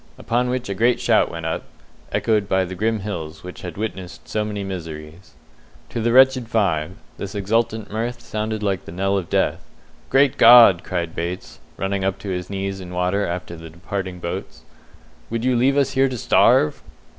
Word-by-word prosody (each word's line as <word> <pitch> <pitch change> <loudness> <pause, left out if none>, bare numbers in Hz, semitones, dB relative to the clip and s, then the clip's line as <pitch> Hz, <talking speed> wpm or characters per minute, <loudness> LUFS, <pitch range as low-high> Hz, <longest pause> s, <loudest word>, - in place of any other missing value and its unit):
Upon 120 +1 0
which 125 0 -2
a 100 - -2
great 115 +5 +2
shout - - +3
went 85 -1 -6
up, 80 -2 -2 0.5
echoed 105 -3 +1
by 95 0 +2
the 90 - -7
grim 110 +3 -1
hills 85 -6 -6
which 90 0 -9
had 90 -2 -7
witnessed 95 -4 -6
so 110 - -1
many 105 -1 -4
miseries. 80 -2 -8 0.5
To 115 - -3
the 115 +1 +1
wretched 130 -1 +5
five, 90 -8 0 0.3
this 100 +1 -6
exultant 110 +1 -1
mirth 120 +3 -3
sounded 110 -1 -4
like 100 -2 0
a - - -7
knell 95 +3 0
of 95 -4 -2
death. - - 0 0.5
"Great 135 0 +3
God!" 115 -7 +8
cried 85 -3 -3
Bates, 85 -8 -5 0.2
running 95 0 -2
up 95 -1 0
to 100 - -7
his 90 -1 -4
knees 95 0 -4
in 90 - -9
water 90 +3 0
after 85 0 -5
the 80 0 -10
departing 95 +2 -5
boats, 85 -1 -6 0.7
"would 115 +1 -2
you 130 -1 +2
leave 135 +4 +3
us 140 - +2
here 135 0 +2
to 125 - -4
starve?" 75 -7 +3
100 Hz, 185 wpm, -21 LUFS, 90-115 Hz, 0.7 s, God